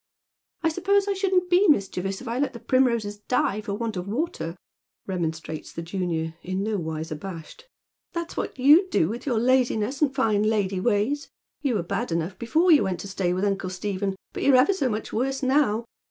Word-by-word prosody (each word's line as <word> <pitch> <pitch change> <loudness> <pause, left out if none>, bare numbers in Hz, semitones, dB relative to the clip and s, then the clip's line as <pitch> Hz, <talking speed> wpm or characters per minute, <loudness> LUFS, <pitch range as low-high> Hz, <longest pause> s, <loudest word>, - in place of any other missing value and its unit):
" - - -56
1 325 - +2
suppose 400 +3 +2
I 400 - +2
shouldn't 375 -2 +1
be 360 +3 +4
mischievous 195 - +1
if 260 - -9
I 235 +2 -2
let 280 -1 0
the 235 - -8
primroses 235 -4 +1
die 215 -2 0
for 200 -1 -4
want 225 -1 -3
of 180 +1 -4
water," 200 - -3 0.5
remonstrates 160 -4 -4
the 165 - -6
junioi", 165 -2 -2
in 185 +2 -3
no 215 0 -1
wise 160 -2 -4
abashed. 170 - -8 0.2
" - - -68
That's 340 -1 -4
what - - -4
you'd 300 +9 +6
do, 165 - +2
with 235 +6 -6
your 245 -4 +1
laziness 250 +1 +1
and 295 -3 +3
fine 225 -6 +1
• 215 - +3
lady 200 -3 0
ways. 235 +8 0 0.3
You 270 -5 0
were 190 - 0
bad 170 - -3
enough 170 +3 -2
before 325 +10 +3
you 300 - +7
went 190 -2 -2
to - - -7
stay 190 -2 -1
with 185 +3 0
uncle 195 -2 -1
Stephen, 195 +1 -2 0.2
but - - -5
you're 275 - +5
ever 260 +10 +5
so 280 -9 0
much 215 -1 -4
worse 270 +4 -1
now. 255 -5 +2
215 Hz, 210 wpm, -25 LUFS, 190-275 Hz, 0.5 s, you